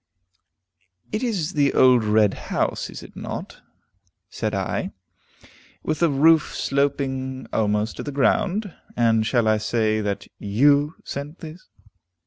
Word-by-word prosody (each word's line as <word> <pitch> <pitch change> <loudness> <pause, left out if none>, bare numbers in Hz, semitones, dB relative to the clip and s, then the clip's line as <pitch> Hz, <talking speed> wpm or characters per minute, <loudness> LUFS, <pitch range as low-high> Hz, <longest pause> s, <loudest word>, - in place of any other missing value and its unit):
"It 215 - -2
is 195 -9 -1
the 145 -2 +2
old 125 -3 +6
red 105 -1 +3
house, - - -2
is - - -9
it - - -14
not?" - - -7 0.7
said 110 -2 -2
I, 95 -2 -2 0.9
"with 155 -1 -2
the 170 - +3
roof 155 +3 +4
sloping 135 -2 -1
almost 105 0 0
to - - -4
the 145 - -5
ground. 195 +7 +1 0.2
And 115 -2 +3
shall 120 -3 +2
I 110 0 +3
say 110 -1 0
that 100 -1 -3
you 140 +9 +3
sent 145 +4 -6
this? 165 +2 -10
135 Hz, 130 wpm, -23 LUFS, 110-155 Hz, 0.9 s, old